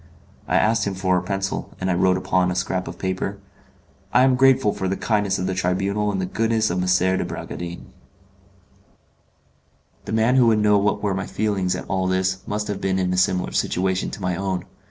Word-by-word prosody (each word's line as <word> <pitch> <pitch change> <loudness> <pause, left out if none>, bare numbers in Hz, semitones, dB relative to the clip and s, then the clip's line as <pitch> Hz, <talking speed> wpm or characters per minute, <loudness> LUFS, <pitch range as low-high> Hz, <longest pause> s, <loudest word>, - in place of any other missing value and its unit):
I - - 0
asked 110 0 +2
him 100 - -2
for 95 0 +1
a 90 - +1
pencil, 95 +1 -4
and 95 0 -1
I - - +2
wrote 90 +1 +3
upon 95 0 +1
a 90 - -2
scrap 90 0 -2
of - - -7
paper: 95 +1 -3 0.7
"I 125 - +5
am 130 0 +4
grateful 130 -5 +4
for 95 - -3
the 95 - -1
kindness 105 -3 0
of 90 - -2
the 95 - -1
Tribunal 95 +3 0
and 95 - -2
the 95 - -1
goodness 110 +2 0
of 90 +1 -1
M. 95 +1 +2
de - - 0
Bragadin." 85 0 -6 2.2
The - - -6
man 110 +4 +3
who 125 -2 +5
would 110 -1 +4
know 105 -1 +4
what 105 +1 0
were 100 -2 +1
my 95 0 -3
feelings 95 -4 -1
at - - -6
all 95 -1 0
this 95 0 0
must 105 0 -2
have 105 -2 -4
been 95 -1 0
in 90 -1 0
a - - -1
similar 95 0 +1
situation 95 +1 0
to - - -8
my 90 -1 0
own. 95 -1 -3
95 Hz, 210 wpm, -22 LUFS, 95-105 Hz, 2.2 s, I